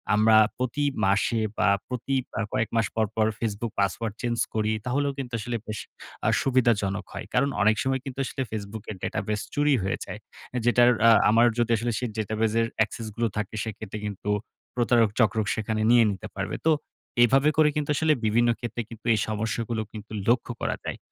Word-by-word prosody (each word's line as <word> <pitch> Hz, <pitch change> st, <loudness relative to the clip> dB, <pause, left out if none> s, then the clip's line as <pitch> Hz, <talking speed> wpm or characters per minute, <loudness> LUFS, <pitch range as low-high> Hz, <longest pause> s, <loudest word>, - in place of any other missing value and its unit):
আমরা 110 Hz, +1 st, +5 dB, 0.2 s
প্রতি 130 Hz, +3 st, -1 dB, 0.2 s
মাসে 110 Hz, +4 st, +2 dB, 0.2 s
বা -, -, +3 dB, 0.2 s
প্রতি 125 Hz, +2 st, -2 dB, 0.2 s
আ -, -, +1 dB
কয়েক 110 Hz, -, 0 dB
মাস 115 Hz, -3 st, +2 dB
পর, 110 Hz, -1 st, +2 dB
পর 110 Hz, -1 st, +3 dB
Facebook 110 Hz, 0 st, -2 dB
পাসওয়ার্ড 100 Hz, +2 st, -1 dB
চেঞ্জ 120 Hz, -1 st, -1 dB, 0.2 s
করি, 110 Hz, 0 st, +1 dB
তাহলেও 140 Hz, +3 st, 0 dB
কিন্তু 125 Hz, -3 st, -6 dB
আসলে 120 Hz, +2 st, -3 dB
বেশ 110 Hz, -2 st, -4 dB, 0.5 s
আ -, -, +5 dB
সুবিধাজনক 105 Hz, -7 st, +1 dB
হয়। 100 Hz, -, -6 dB
কারণ 140 Hz, +3 st, +3 dB
অনেক 110 Hz, +1 st, +4 dB
সময় 130 Hz, 0 st, 0 dB
কিন্তু 135 Hz, -1 st, -6 dB
আসলে 135 Hz, -, -4 dB
বেশ 120 Hz, -, -11 dB
Facebook 105 Hz, 0 st, -5 dB
এর 95 Hz, -, -7 dB
ডেটাবেস 105 Hz, 0 st, -2 dB
চুরি 145 Hz, 0 st, +3 dB
হয়ে 95 Hz, -, -1 dB
যায়। -, -, -7 dB, 0.3 s
এ্যা 125 Hz, -, -2 dB
যেটার 120 Hz, 0 st, +5 dB, 0.2 s
আ -, -, +9 dB, 0.2 s
আমার 115 Hz, +3 st, +5 dB
যদি 120 Hz, 0 st, +1 dB
আসলে 120 Hz, +2 st, -1 dB
সেই 125 Hz, -2 st, -2 dB
ডেটাবেস 110 Hz, 0 st, 0 dB
এর 115 Hz, -, +1 dB, 0.2 s
access 110 Hz, +2 st, -6 dB
গুলো 115 Hz, +1 st, +1 dB
থাকে, 105 Hz, 0 st, -3 dB
সেক্ষেত্রে 105 Hz, -1 st, -6 dB
কিন্তু 105 Hz, 0 st, -5 dB, 0.5 s
প্রতারক 120 Hz, -2 st, +3 dB
চক্র 110 Hz, -2 st, +3 dB, 0.2 s
সেখানে 110 Hz, 0 st, -2 dB
নিয়ে 120 Hz, -1 st, +7 dB
নিতে 95 Hz, -, -6 dB
পারবে। -, -, -3 dB
তো 160 Hz, -, +6 dB, 0.5 s
এভাবে 135 Hz, +5 st, +4 dB
করে 155 Hz, -1 st, +6 dB
কিন্তু 150 Hz, -1 st, -2 dB
আসলে 160 Hz, +2 st, +3 dB
বিভিন্ন 120 Hz, +2 st, +3 dB
ক্ষেত্রে 120 Hz, 0 st, -4 dB
কিন্তু 115 Hz, -1 st, -12 dB
এই 110 Hz, -, +1 dB
সমস্যাগুলো 110 Hz, +1 st, -2 dB
কিন্তু 110 Hz, 0 st, -10 dB, 0.2 s
লক্ষ্য 120 Hz, +1 st, +2 dB
করা -, -, 0 dB
যায়। -, -, -4 dB
115 Hz, 190 wpm, -26 LUFS, 110-125 Hz, 0.5 s, আ